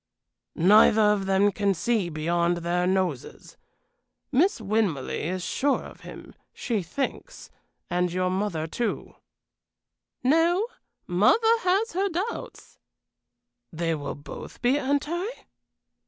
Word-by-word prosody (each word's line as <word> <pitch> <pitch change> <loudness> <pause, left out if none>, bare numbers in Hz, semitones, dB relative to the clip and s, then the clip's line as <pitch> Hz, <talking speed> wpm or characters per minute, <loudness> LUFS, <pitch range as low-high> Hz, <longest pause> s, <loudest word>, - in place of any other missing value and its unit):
"Neither 210 +5 +6
of 195 -2 -3
them 195 +1 +3
can 200 0 0
see 210 0 0
beyond 170 +2 0
their 180 +1 +1
noses. 185 -8 -2 0.8
Miss 320 +7 +2
Winmarleigh 195 -8 -1
is 185 -1 -4
sure 280 +9 0
of - - -12
him, - - -11 0.2
she 225 -5 -2
thinks 275 - -5 0.4
and 180 0 0
your 185 +1 0
mother, 185 -5 -1
too." 230 +8 -3 1.1
"No; 330 - +3 0.4
mother 180 - +4 0.2
has 395 +4 +1
her 390 +3 0
doubts." 380 +7 -5 0.9
"They 165 0 -1
will 145 -3 -4
both 145 - -10
be 260 +4 +3
anti?" 295 +7 -1
200 Hz, 110 wpm, -26 LUFS, 175-280 Hz, 1.1 s, Neither